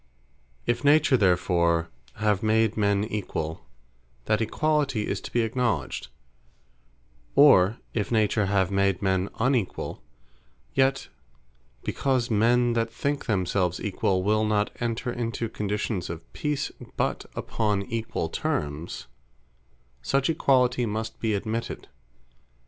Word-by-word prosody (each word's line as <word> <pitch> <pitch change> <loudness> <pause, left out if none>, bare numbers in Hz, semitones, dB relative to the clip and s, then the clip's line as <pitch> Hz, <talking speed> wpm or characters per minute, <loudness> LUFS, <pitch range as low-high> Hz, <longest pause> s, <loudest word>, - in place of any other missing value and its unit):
If 120 0 0
Nature 145 -1 +5
therefore 85 -5 +2 0.2
have 105 -2 +1
made 110 0 +2
men 100 -1 +2
equall, 100 -7 -3 0.7
that 110 - +2
equalitie 135 -1 0
is - - -3
to - - -8
be 120 - +2
acknowledged; 115 - -1 1.3
or 115 -7 +6 0.2
if 105 -1 -2
Nature 110 -2 +2
have 95 -1 +1
made 100 -1 +1
men 95 0 +1
unequall; 120 - 0 0.7
yet 135 0 +1 0.7
because 130 -3 0
men 120 +3 +3
that 115 0 0
think 140 +5 -2
themselves 95 -4 0
equall, 95 -2 0
will 110 +2 +2
not 105 -1 +1
enter 120 +1 -2
into 115 -1 -2
conditions 105 -2 -3
of 85 0 -8
Peace, 150 -2 -2 0.3
but - - -1
upon 105 -3 -1
Equall 110 -6 -3
termes, 75 +2 -3 1.0
such 135 - +1
equalitie 125 -5 +2
must 110 +1 -4
be 110 -2 0
admitted. 110 +3 -4
110 Hz, 115 wpm, -26 LUFS, 100-120 Hz, 1.3 s, or